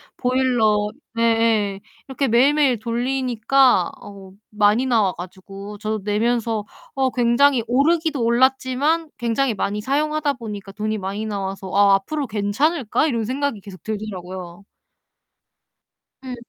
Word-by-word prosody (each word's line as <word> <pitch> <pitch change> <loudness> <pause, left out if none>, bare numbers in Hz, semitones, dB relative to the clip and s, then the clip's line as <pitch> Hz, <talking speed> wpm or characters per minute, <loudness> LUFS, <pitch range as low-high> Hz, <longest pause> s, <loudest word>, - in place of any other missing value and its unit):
보일러 245 -5 +1 0.3
네예 225 -3 +1 0.3
이렇게 270 0 -1
매일매일 265 +1 +3
돌리니까 245 -2 +1
어 195 -2 -12 0.2
많이 210 +4 +2
나와 220 -7 +2
가지고 195 +3 -9
저도 215 +1 -3
내면서 225 +1 0 0.3
어 265 -1 +1
굉장히 245 +1 +3
오르기도 295 +1 +1
올랐지만 265 +6 +1
굉장히 240 +1 0
많이 205 +1 -2
사용하다 295 +3 0
보니까 205 -5 -8
돈이 215 +2 -3
많이 200 +2 -4
나와서 195 -2 -4
'어 200 +1 +4
앞으로 280 +8 -3
괜찮을까?' 225 +8 0
이런 230 -6 -1
생각이 265 -1 -2
계속 185 -4 -13
들더라고요. 190 -4 -6 1.6
응. 255 -1 -6
230 Hz, 295 characters per minute, -21 LUFS, 205-265 Hz, 1.6 s, 어